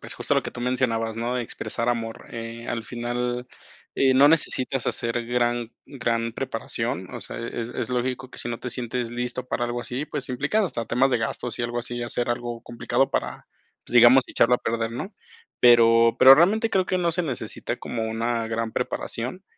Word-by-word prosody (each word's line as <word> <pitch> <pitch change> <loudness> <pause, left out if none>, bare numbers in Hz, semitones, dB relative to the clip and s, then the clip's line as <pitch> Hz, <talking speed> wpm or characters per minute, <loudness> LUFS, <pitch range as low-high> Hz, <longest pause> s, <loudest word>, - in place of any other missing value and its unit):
pues, - - -4
justo - - 0
lo - - +2
que - - -5
tú - - -8
mencionabas, 115 -3 0
¿no?, 120 +2 -2
de 125 - -1
expresar 115 +1 -4
amor. 115 -2 -3
Eh, 115 0 -7
al 115 -1 -2
final, 120 +1 -3 0.5
eh, 135 -1 +3
no 140 +2 +7
necesitas 135 -4 +1
hacer 115 0 -1
gran 120 -1 0 0.2
gran 115 -4 -2
preparación, - - -3
o - - -5
sea, - - -8
es 115 0 -4
es 115 - -4
lógico 125 +1 -2
que - - -11
si - - -3
no 115 - -3
te 125 - -5
sientes 120 -1 -3
listo 125 +1 -4
para 120 - -1
algo 120 0 -3
así, 125 +4 -4
pues, 145 -2 -5
implicado 145 - +1
hasta 120 -7 -4
temas 130 +3 +2
de 120 - +2
gastos 120 +2 -3
y - - -1
algo 120 0 -2
así, 120 0 -3
hacer 120 0 -1
algo 120 -1 -3
complicado 120 -1 0
para - - -3 0.4
pues, - - -9
digamos 120 +2 +8
echarlo 125 +1 +3
a - - +1
perder, 115 0 -2
¿no?, 190 - -6 0.5
pero 115 -1 +6
pero 135 +1 +10
realmente 215 +8 +3
creo 185 -1 +2
que 185 - 0
no 170 -2 +1
se 180 +1 0
necesita 135 -7 -4
como 115 -2 -4
una 115 0 -1
gran 115 0 -2
preparación. 130 +12 -3
120 Hz, 200 wpm, -24 LUFS, 115-130 Hz, 0.5 s, pero